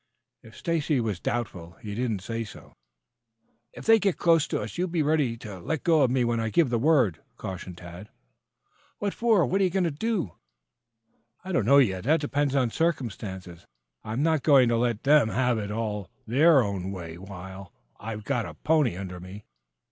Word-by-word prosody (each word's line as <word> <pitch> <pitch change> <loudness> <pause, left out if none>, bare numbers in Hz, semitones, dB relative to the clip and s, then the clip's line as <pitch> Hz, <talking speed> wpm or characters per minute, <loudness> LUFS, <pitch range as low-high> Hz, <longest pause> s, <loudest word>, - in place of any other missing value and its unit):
If 110 - -15
Stacy 160 -4 0
was 110 -6 -2
doubtful 90 -8 -4
he 105 +2 -8
did 120 +3 -1
not 105 -4 -2
say 115 +3 -4
so. 105 - -13 1.0
"If - - -11
they 225 0 +6
get 200 -4 0
close 165 -3 +3
to - - -2
us, 105 +1 -6
you 180 - +1
be 170 -3 0
ready 145 -6 +1
to 105 -5 -9
let 150 - -3
go 165 -3 +4
of 130 - +4
me 125 0 +1
when 120 -1 0
I 110 0 -1
give 150 +1 +2
the 120 - +1
word," 130 - +3 0.2
cautioned 90 -1 -7
Tad. 90 +4 -10 0.9
"What 200 -1 -2
for? 225 -7 +3
What 195 +2 0
you 190 - +3
going 190 +1 0
to 170 - 0
do?" 185 - -2 1.1
"I 190 - -6
don't 125 - +1
know 140 +2 +7
yet. 95 -8 +2
That 155 +4 +3
depends 145 -1 -1
upon 125 -4 +2
circumstances. 100 - -3 0.4
I'm 110 +6 -2
not 160 -2 +2
going 135 -5 +5
to 115 - +2
let 120 -2 0
them 145 -5 +5
have 125 -1 +1
it 100 -1 -4
all 105 -3 -3 0.2
their 140 +4 +5
own 95 -2 -3
way 85 -3 -7
while 95 0 -9 0.3
I've 105 -1 -6
got 125 0 -1
a - - -10
pony 150 - +1
under 90 -2 -6
me. 95 +4 -10
120 Hz, 195 wpm, -26 LUFS, 100-155 Hz, 1.1 s, know